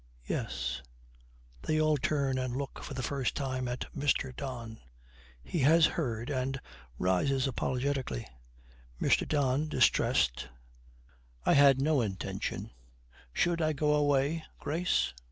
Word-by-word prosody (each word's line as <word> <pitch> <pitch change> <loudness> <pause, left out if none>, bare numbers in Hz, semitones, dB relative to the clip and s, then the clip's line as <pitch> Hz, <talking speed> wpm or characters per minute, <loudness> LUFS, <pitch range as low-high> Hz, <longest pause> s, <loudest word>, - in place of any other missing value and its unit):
Yes.' - - -3 0.8
They 155 0 0
all 155 -1 +3
turn 135 -2 0
and 130 -1 -2
look 140 0 -5
for 140 - -6
the 130 - -3
first 135 0 -1
time 130 -2 -2
at 125 +1 -3
Mr. 135 -2 0
Don. 120 -5 -6 0.6
He 170 - -3
has 155 +4 +6
heard, 120 -6 -2
and 135 0 -1 0.4
rises 95 - +1
apologetically. 130 - -1 0.7
MR. - - +2
DON, 145 0 +1
distressed, - - +2 1.0
'I - - +5
had 140 -2 +6
no 150 -1 +3
intention 95 -4 -4 0.6
Should 170 - +1
I 155 0 +2
go 150 +1 +2
away, 145 +2 +2 0.2
Grace?' 165 - 0
135 Hz, 120 wpm, -31 LUFS, 130-150 Hz, 1.0 s, has